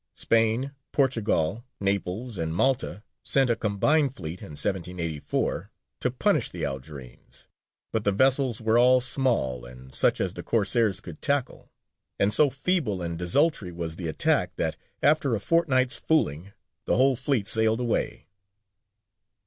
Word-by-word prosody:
Spain, 115 +4 +1 0.2
Portugal, 115 - 0 0.2
Naples, 100 +2 -2
and 80 0 -2
Malta 125 -3 0 0.2
sent 135 -3 +2
a - - +2
combined 130 +7 +1
fleet 85 0 -7
in 75 - -9
1784 85 -2 -2 0.3
to - - 0
punish - - +1
the - - -4
Algerines, 65 -2 -9 0.4
but 110 -2 -1
the 100 - +2
vessels 130 +2 +2
were 110 +1 +2
all 125 +1 +6
small 120 - 0
and 65 +2 -13
such - - +3
as - - -1
the - - -7
Corsairs 110 -2 +1
could 85 -4 -10
tackle, 140 -3 -2 0.5
and 100 +1 +3
so 150 +5 +5
feeble 135 - -1
and 85 -1 -4
desultory 100 - +1
was 85 -2 -5
the 85 -1 -5
attack 80 - 0
that, - - -1 0.3
after 145 -4 +3
a - - -2
fortnight's 130 -6 +2
fooling, 100 - 0 0.3
the - - +1
whole 130 +1 +4
fleet 130 -4 -1
sailed 110 +1 +2
away. 120 -2 -2
110 Hz, 140 wpm, -26 LUFS, 85-130 Hz, 0.5 s, all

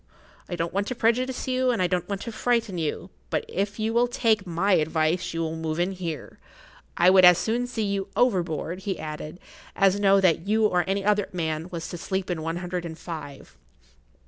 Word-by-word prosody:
I 175 - -2
don't 170 0 -3
want 200 +1 -1
to 255 - -3
prejudice 245 +3 0
you, 255 0 +1
and 235 -4 +1
I 185 - +3
don't 180 +1 -1
want 200 -1 -3
to 230 - -5
frighten 225 -4 0
you, 165 +3 -3 0.2
but - - -1
if 200 +2 -2
you 220 0 -1
will 240 +1 +3
take 225 -5 +1
my 175 +4 0
advice 160 +1 +1
you 165 - -3
will 160 0 -2
move 160 0 -3
in 180 +2 +1
here. 170 -6 -6 0.6
I 180 +2 +6
would 190 -1 +6
as 180 -1 +9
soon 235 +6 -1
see 235 -3 -3
you 200 -1 -1
overboard," 180 - 0
he 195 0 -3
added, 155 +2 -7 0.4
"as 195 0 +3
know 195 -1 +5
that 180 -1 +2
you 220 +1 +3
or 180 -4 +2
any 195 0 -1
other 205 -1 +2
man 160 -1 -2
was 170 -2 -5
to 175 - -6
sleep 190 +1 -2
in 165 -3 -2
one 165 +2 -3
hundred 180 0 -4
and 160 -2 -7
five." 155 -6 -8
185 Hz, 210 wpm, -25 LUFS, 165-210 Hz, 0.6 s, as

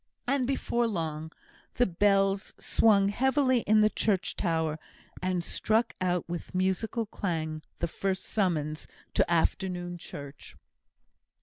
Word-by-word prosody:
And 265 -1 +1
before 240 -3 0
long, 160 -6 -3 0.4
the 245 - +4
bells 195 +1 +2
swung 200 -3 +3
heavily 260 +3 +2
in 215 +1 +5
the 215 - +5
church 200 -4 0
tower, 160 -3 0 0.4
and 185 -1 0
struck 220 +6 +1
out 180 -2 0
with 175 +1 -6
musical 190 +5 0
clang 160 -6 -3 0.2
the 170 - -1
first 190 +2 -2
summons 155 -7 -1 0.3
to - - +2
afternoon 175 +1 0
church. 140 -3 -9
185 Hz, 120 wpm, -29 LUFS, 170-215 Hz, 0.4 s, in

